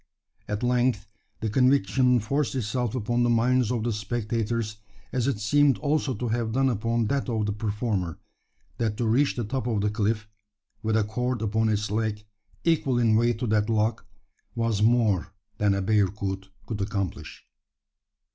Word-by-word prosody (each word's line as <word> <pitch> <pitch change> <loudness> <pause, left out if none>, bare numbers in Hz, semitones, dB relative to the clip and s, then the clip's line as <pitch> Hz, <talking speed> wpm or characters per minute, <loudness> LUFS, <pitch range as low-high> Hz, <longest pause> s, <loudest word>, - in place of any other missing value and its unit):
At 105 +2 -3
length 125 -2 +1 0.4
the 110 - -1
conviction 125 0 +3
forced 135 +3 -1
itself 120 0 -1
upon 120 0 0
the 120 - +3
minds 120 0 +3
of 120 -3 -1
the 120 0 0
spectators 110 0 -2 0.4
as 125 0 0
it 140 - 0
seemed 140 +6 +3
also 145 -3 0
to 120 +3 -3
have 115 -1 -1
done 135 +1 +3
upon 115 0 0
that 140 +3 -1
of 110 -3 0
the 105 - 0
performer 105 -4 -2 0.6
that 110 -3 0
to 120 - -1
reach 130 +6 +2
the 120 - -2
top 125 +2 -3
of 110 -4 0
the 105 0 +1
cliff 105 0 -1 0.5
with 110 -1 +1
a 110 - +3
cord 125 +2 -2
upon 110 +1 +1
its 105 -1 -1
leg, 105 -1 -1 0.4
equal 150 -6 +2
in 115 -2 +3
weight 120 +1 +2
to 125 - -2
that 105 -1 +1
log 110 +1 +1 0.5
was 115 -3 0
more 110 -6 +2 0.3
than 100 -1 +3
a 100 - -1
bearcoot 95 -1 0 0.2
could 110 -3 -4
accomplish. 100 -6 -4
115 Hz, 165 wpm, -26 LUFS, 105-125 Hz, 0.6 s, conviction